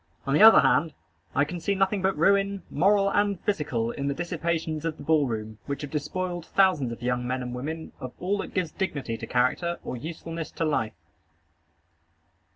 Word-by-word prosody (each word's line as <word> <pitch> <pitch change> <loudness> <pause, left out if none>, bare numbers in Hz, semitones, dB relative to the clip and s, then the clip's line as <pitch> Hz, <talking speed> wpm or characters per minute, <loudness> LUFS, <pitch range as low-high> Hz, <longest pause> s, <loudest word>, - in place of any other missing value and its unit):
On 140 - 0
the 150 - +4
other 225 +1 +10
hand, 160 -1 +2 0.4
I 140 - +4
can 175 +4 -6
see 200 +4 0
nothing 195 +1 +1
but 190 -2 +1
ruin, 195 +2 +2
moral 195 +4 +3
and 205 -2 +1
physical, 140 - -1
in 140 +3 -4
the 140 - -1
dissipations 165 -2 -2
of 165 -2 -2
the - - -9
ball 150 -2 +3
room, 110 -2 -5
which 140 +1 -4
have 145 - -6
despoiled 175 +3 -3
thousands 185 -11 +3
of 115 +1 -8
young 125 0 -1
men 130 0 -2
and 125 0 -5
women 155 +6 -5
of 130 - -6
all 200 +3 -1
that - - -6
gives 180 -4 0
dignity 140 -11 -3
to - - -7
character, 130 +8 +1
or - - -4
usefulness 165 +4 -6
to 165 - -1
life. 115 -8 0
160 Hz, 190 wpm, -26 LUFS, 135-185 Hz, 0.4 s, other